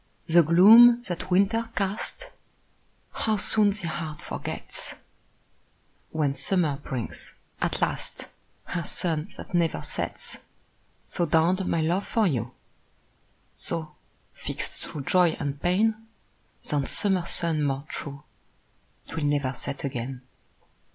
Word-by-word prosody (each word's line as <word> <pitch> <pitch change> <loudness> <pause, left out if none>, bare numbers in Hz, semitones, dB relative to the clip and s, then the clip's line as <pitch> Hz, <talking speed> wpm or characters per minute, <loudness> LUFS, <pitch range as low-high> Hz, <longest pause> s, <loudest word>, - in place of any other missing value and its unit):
The 170 +1 +6
gloom 225 +9 +8
that 185 -2 -5
winter 205 +5 +2
cast, 200 - -3 0.9
How 220 -1 0
soon 210 0 +3
the 200 -3 -3
heart 155 -2 -4
forgets, - - -6 1.1
When 150 -3 0
summer 160 -2 0
brings, 130 -5 -6 0.3
at - - 0
last, - - -3 0.4
Her 170 -1 -3
sun 165 -3 -2
that - - -10
never 170 -2 +1
sets! - - -5 0.7
So 175 - -2
dawned 175 +4 +2
my 165 - +1
love 175 +5 0
for 225 -2 +2
you; 125 - 0 1.0
So, 155 -2 -5 0.4
fixt - - -6
thro' 150 - -6
joy 175 +3 +3
and 145 -1 -3
pain, 215 +5 +1 0.6
Than 145 -2 0
summer 190 -4 0
sun 165 -3 0
more 140 0 -1
true, 140 -2 -7 0.8
'Twill 160 -2 -3
never 145 -2 +1
set 135 +2 -6
again. 130 -1 -4
170 Hz, 115 wpm, -26 LUFS, 145-195 Hz, 1.1 s, gloom